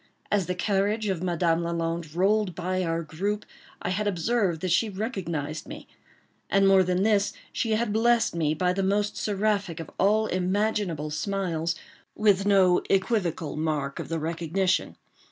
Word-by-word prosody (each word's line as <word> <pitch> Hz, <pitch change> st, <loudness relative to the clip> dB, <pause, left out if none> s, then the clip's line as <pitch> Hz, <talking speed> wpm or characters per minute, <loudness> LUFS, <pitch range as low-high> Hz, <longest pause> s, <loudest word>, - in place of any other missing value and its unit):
As 200 Hz, -4 st, +1 dB
the 180 Hz, -, -1 dB
carriage 205 Hz, +3 st, 0 dB
of 185 Hz, -4 st, -1 dB
Madame 170 Hz, -2 st, +1 dB
Lalande 165 Hz, -1 st, -3 dB
rolled 195 Hz, 0 st, +2 dB
by 185 Hz, +1 st, -1 dB
our 165 Hz, -1 st, -1 dB
group, 200 Hz, +7 st, -3 dB, 0.4 s
I -, -, -1 dB
had 210 Hz, +3 st, -1 dB
observed 195 Hz, -2 st, 0 dB
that 185 Hz, -, -1 dB
she 215 Hz, +6 st, +3 dB
recognized 170 Hz, -, -4 dB
me; 295 Hz, +2 st, -9 dB, 0.6 s
and 195 Hz, 0 st, +4 dB
more 195 Hz, -1 st, +6 dB
than 180 Hz, +1 st, +1 dB
this, 205 Hz, -1 st, +2 dB, 0.2 s
she 225 Hz, -2 st, 0 dB
had 215 Hz, -1 st, 0 dB
blessed 235 Hz, +1 st, +3 dB
me, 155 Hz, -2 st, +1 dB
by 180 Hz, +2 st, +1 dB
the 195 Hz, -, -1 dB
most 205 Hz, +2 st, +1 dB
seraphic 200 Hz, -4 st, -1 dB
of 165 Hz, -, -7 dB
all 215 Hz, +3 st, +3 dB
imaginable 185 Hz, -4 st, -1 dB
smiles, 170 Hz, -1 st, -1 dB, 0.4 s
with 200 Hz, -2 st, +3 dB
no 190 Hz, -3 st, +5 dB
equivocal 185 Hz, -6 st, 0 dB
mark 150 Hz, -3 st, -2 dB
of -, -, -6 dB
the 165 Hz, -, -1 dB
recognition. 165 Hz, +4 st, -1 dB
185 Hz, 155 wpm, -26 LUFS, 165-205 Hz, 0.6 s, more